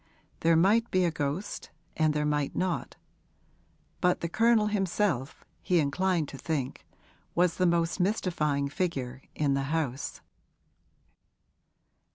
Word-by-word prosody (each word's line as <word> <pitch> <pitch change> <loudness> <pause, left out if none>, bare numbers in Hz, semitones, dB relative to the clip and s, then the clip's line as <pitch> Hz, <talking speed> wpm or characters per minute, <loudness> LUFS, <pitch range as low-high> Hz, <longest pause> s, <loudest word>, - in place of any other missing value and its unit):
There 165 0 +4
might 210 +8 +4
be 185 -1 +2
a 170 - +1
ghost 150 +6 -3 0.3
and 155 -1 +3
there 150 0 0
might 150 -1 0
not; 185 -1 -2 1.0
but 180 -1 +2
the 170 - -2
Colonel 225 +3 +4
himself, 195 - -1 0.2
he 180 - +2
inclined 165 +2 +1
to 135 - -9
think, 145 -6 -3 0.5
was 175 -1 +2
the 185 - +3
most 170 +1 +1
mystifying 170 -7 0
figure 135 -5 -3
in 145 -2 +1
the 135 0 0
house. 145 -4 -2
165 Hz, 125 wpm, -29 LUFS, 145-185 Hz, 1.0 s, There